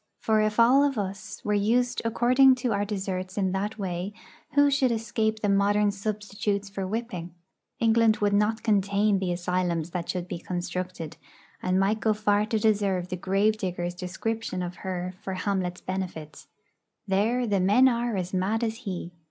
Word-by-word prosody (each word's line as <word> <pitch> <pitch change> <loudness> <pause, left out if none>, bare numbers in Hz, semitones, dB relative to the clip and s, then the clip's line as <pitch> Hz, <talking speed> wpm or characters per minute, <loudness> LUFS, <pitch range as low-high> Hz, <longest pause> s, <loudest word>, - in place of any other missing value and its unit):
For, 220 -1 +2
if 215 +1 0
all 255 +5 +6
of 280 -3 +1
us 200 +1 -5
were 210 - +1
used 235 +5 +1
according 255 +3 +5
to 245 -1 -2
our 200 0 0
deserts 190 -2 -4
in 190 -2 +1
that 205 +3 -2
way, 185 0 -3 0.4
who 285 0 +5
should 270 -3 +2
escape 220 -1 -1
the 210 - +1
modern 205 +1 +3
substitutes 205 0 -3
for 195 -1 -3
whipping? 185 -6 -4 0.4
England 225 -1 +4
would 205 -1 +1
not 210 +2 +1
contain 205 -1 +2
the 185 -2 -1
asylums 175 -2 -1
that 175 -1 -4
should 180 -1 -2
be 175 -1 -5
constructed, 180 -2 -5 0.4
and 185 +1 +1
might 205 +3 +2
go 220 0 +2
far 210 0 +2
to 225 -1 0
deserve 200 -4 +1
the 185 - -2
Gravedigger's 190 -2 0
description 185 +2 -3
of 175 0 -6
her 185 -1 -4
for 190 - -4
Hamlet's 185 -2 -2
benefit: 180 -5 -5 0.6
'There 220 +6 +1
the 205 -3 +1
men 205 +8 +5
are 235 -3 0
as 180 0 -3
mad 200 +5 0
as 225 -1 -1
he.' 185 -7 -5
200 Hz, 170 wpm, -27 LUFS, 185-220 Hz, 0.6 s, all